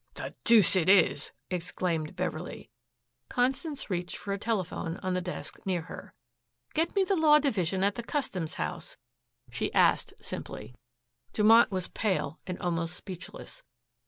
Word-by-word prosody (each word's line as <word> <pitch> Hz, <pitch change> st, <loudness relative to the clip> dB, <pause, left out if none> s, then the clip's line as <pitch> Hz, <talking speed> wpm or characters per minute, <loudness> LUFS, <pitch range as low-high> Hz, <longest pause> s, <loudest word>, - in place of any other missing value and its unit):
"The -, -, -6 dB
deuce 220 Hz, -5 st, +6 dB
it 185 Hz, -1 st, +3 dB
is!" 200 Hz, 0 st, +4 dB, 0.2 s
exclaimed 170 Hz, -2 st, -2 dB
Beverley. 180 Hz, -2 st, -4 dB, 0.6 s
Constance 270 Hz, -, -1 dB
reached 175 Hz, -1 st, -2 dB
for 200 Hz, -, -4 dB
a 200 Hz, -, -3 dB
telephone 190 Hz, -6 st, -2 dB
on 185 Hz, 0 st, 0 dB
the 180 Hz, -, 0 dB
desk 180 Hz, 0 st, -6 dB
near 180 Hz, -4 st, -1 dB
her. -, -, -10 dB, 0.6 s
"Get 325 Hz, +5 st, 0 dB
me 395 Hz, -, +4 dB
the 390 Hz, +1 st, +1 dB
Law 310 Hz, -3 st, +6 dB
Division 195 Hz, -, 0 dB
at 200 Hz, +1 st, +3 dB
the 240 Hz, -, -4 dB
Customs 210 Hz, -, -3 dB
House," -, -, -5 dB, 0.5 s
she -, -, -2 dB
asked -, -, +3 dB
simply. -, -, -7 dB, 0.6 s
Dumont 225 Hz, +2 st, +6 dB
was 185 Hz, -2 st, -2 dB
pale 180 Hz, -7 st, -1 dB
and 180 Hz, -1 st, -3 dB
almost 170 Hz, -1 st, -2 dB
speechless. 190 Hz, -, -9 dB
190 Hz, 145 wpm, -29 LUFS, 175-235 Hz, 0.6 s, deuce